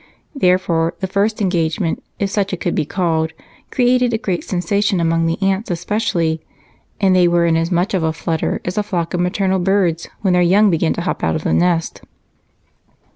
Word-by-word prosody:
Therefore 180 Hz, -, +1 dB
the 190 Hz, -, -2 dB
first 200 Hz, +3 st, 0 dB
engagement, 170 Hz, -1 st, -1 dB
if 195 Hz, -1 st, -2 dB
such 200 Hz, -2 st, -1 dB
it 185 Hz, -, -3 dB
could 175 Hz, -, -1 dB
be 155 Hz, -, -1 dB
called, 160 Hz, -3 st, -1 dB, 0.4 s
created 250 Hz, -1 st, +2 dB
a -, -, +1 dB
great 195 Hz, -6 st, -2 dB
sensation, 195 Hz, +2 st, 0 dB
among 165 Hz, 0 st, +1 dB
the 165 Hz, -, -1 dB
aunts 195 Hz, +2 st, 0 dB
especially, 170 Hz, -3 st, -1 dB, 0.6 s
and 190 Hz, -2 st, +3 dB
they 180 Hz, -1 st, +5 dB
were 170 Hz, 0 st, +2 dB
in 165 Hz, -1 st, +2 dB
as 165 Hz, +1 st, 0 dB
much 180 Hz, +2 st, 0 dB
of 190 Hz, -, +1 dB
a 160 Hz, 0 st, +1 dB
flutter 160 Hz, 0 st, -2 dB
as 180 Hz, +4 st, -2 dB
a -, -, +2 dB
flock 175 Hz, -5 st, -3 dB
of 175 Hz, -, -1 dB
maternal 190 Hz, +1 st, 0 dB
birds 175 Hz, -3 st, +1 dB
when 190 Hz, -3 st, +2 dB
their 180 Hz, -, +3 dB
young 195 Hz, +4 st, +4 dB
begin 165 Hz, -1 st, +1 dB
to -, -, -4 dB
hop 180 Hz, -, -3 dB
out -, -, +1 dB
of 155 Hz, -, -3 dB
the -, -, 0 dB
nest. 175 Hz, -2 st, +1 dB
180 Hz, 195 wpm, -18 LUFS, 165-195 Hz, 0.6 s, they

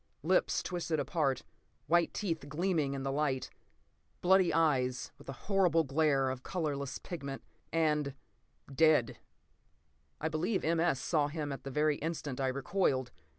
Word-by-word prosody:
Lips -, -, +2 dB
twisted 170 Hz, -3 st, -2 dB
apart. 140 Hz, -1 st, 0 dB, 0.4 s
White 175 Hz, 0 st, +3 dB
teeth 165 Hz, -8 st, -3 dB
gleaming 155 Hz, -3 st, 0 dB
in 135 Hz, -, -4 dB
the 135 Hz, -, -1 dB
light. 135 Hz, -2 st, -1 dB, 0.7 s
Bloody 185 Hz, -1 st, +5 dB
eyes, 130 Hz, -6 st, +1 dB
with 140 Hz, -, -13 dB
a 135 Hz, -, -9 dB
horrible 180 Hz, -5 st, +3 dB
glare 140 Hz, -2 st, +2 dB
of 130 Hz, -1 st, -6 dB
colorless 140 Hz, -5 st, -3 dB
pigment. 140 Hz, -6 st, -6 dB, 0.3 s
And—dead. 150 Hz, -2 st, 0 dB, 1.0 s
I 160 Hz, -, -1 dB
believe 165 Hz, +6 st, -1 dB
M. 165 Hz, +1 st, +2 dB
S. 165 Hz, -5 st, +2 dB
saw 150 Hz, 0 st, +1 dB
him 150 Hz, -1 st, -4 dB
at 135 Hz, -, -6 dB
the -, -, -3 dB
very 150 Hz, +2 st, +1 dB
instant 150 Hz, -4 st, -4 dB
I 135 Hz, -, +1 dB
recoiled. 130 Hz, -1 st, 0 dB
150 Hz, 140 wpm, -32 LUFS, 135-165 Hz, 1.0 s, Bloody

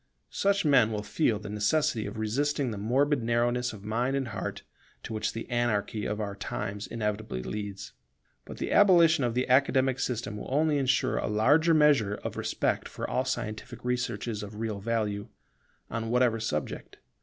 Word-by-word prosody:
Such 200 Hz, -2 st, +1 dB
men 125 Hz, -7 st, +5 dB
will 105 Hz, -1 st, -3 dB
feel 115 Hz, -1 st, +1 dB
the 105 Hz, +1 st, -8 dB
necessity 110 Hz, +2 st, +1 dB
of 100 Hz, -, -7 dB
resisting 135 Hz, +4 st, 0 dB
the 105 Hz, -, -5 dB
morbid 135 Hz, +6 st, +2 dB
narrowness 120 Hz, +1 st, +1 dB
of 105 Hz, -2 st, -11 dB
mind 120 Hz, +5 st, 0 dB
and 135 Hz, -3 st, -1 dB
heart 110 Hz, -, -5 dB, 0.4 s
to -, -, -6 dB
which 110 Hz, 0 st, -1 dB
the 115 Hz, -, -6 dB
anarchy 110 Hz, -3 st, -1 dB
of 105 Hz, -, -3 dB
our 100 Hz, -2 st, -3 dB
times 100 Hz, +1 st, -4 dB
inevitably 105 Hz, -, -3 dB
leads. 100 Hz, +3 st, -6 dB, 0.5 s
But -, -, -10 dB
the -, -, -3 dB
abolition 170 Hz, -6 st, +6 dB
of 120 Hz, -1 st, 0 dB
the 125 Hz, -, 0 dB
Academic 130 Hz, 0 st, +3 dB
system 110 Hz, -5 st, -2 dB
will -, -, -7 dB
only 150 Hz, +1 st, +2 dB
ensure 135 Hz, 0 st, +1 dB
a -, -, -2 dB
larger 145 Hz, +10 st, +4 dB
measure 140 Hz, -10 st, +4 dB
of -, -, -6 dB
respect -, -, -1 dB
for -, -, -5 dB
all 130 Hz, -, 0 dB
scientific 110 Hz, -3 st, -4 dB
researches 120 Hz, -3 st, -2 dB
of 105 Hz, 0 st, -8 dB
real 110 Hz, -2 st, -3 dB
value, 105 Hz, -1 st, -2 dB, 0.6 s
on 115 Hz, -1 st, -3 dB
whatever 120 Hz, -1 st, +2 dB
subject. 75 Hz, -9 st, -4 dB
115 Hz, 170 wpm, -28 LUFS, 105-135 Hz, 0.6 s, abolition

